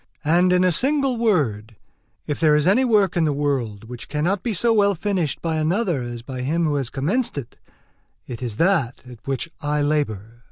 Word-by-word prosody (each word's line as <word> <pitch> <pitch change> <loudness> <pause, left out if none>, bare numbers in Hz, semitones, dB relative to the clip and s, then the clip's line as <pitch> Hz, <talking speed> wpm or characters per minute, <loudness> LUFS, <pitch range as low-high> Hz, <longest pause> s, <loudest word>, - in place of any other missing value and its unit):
And, 175 +4 +3
in 180 0 +3
a 185 - +3
single 270 - +2
word, 135 - 0 0.5
if 145 - -3
there 155 -2 +4
is 150 0 +2
any 215 +8 +4
work 210 -7 +2
in 170 - +2
the 155 - +2
world 135 -8 -2
which 120 +1 -10
cannot 175 +7 -1
be 240 - -2
so 230 +4 +2
well 200 -2 +3
finished 180 -4 -2
by 165 -2 -1
another 170 - 0
as 120 -1 -6
by 130 0 -6
him 160 +6 0
who 150 - 0
has 135 -4 -2
commenced 170 - -1
it, 135 -5 -7 0.7
it 120 -1 -8
is 115 -4 -4
that 165 -9 +1
at 125 -1 -14
which 135 +4 -3
I 150 -1 0
labour. 120 -7 -2
150 Hz, 200 wpm, -22 LUFS, 130-190 Hz, 0.7 s, there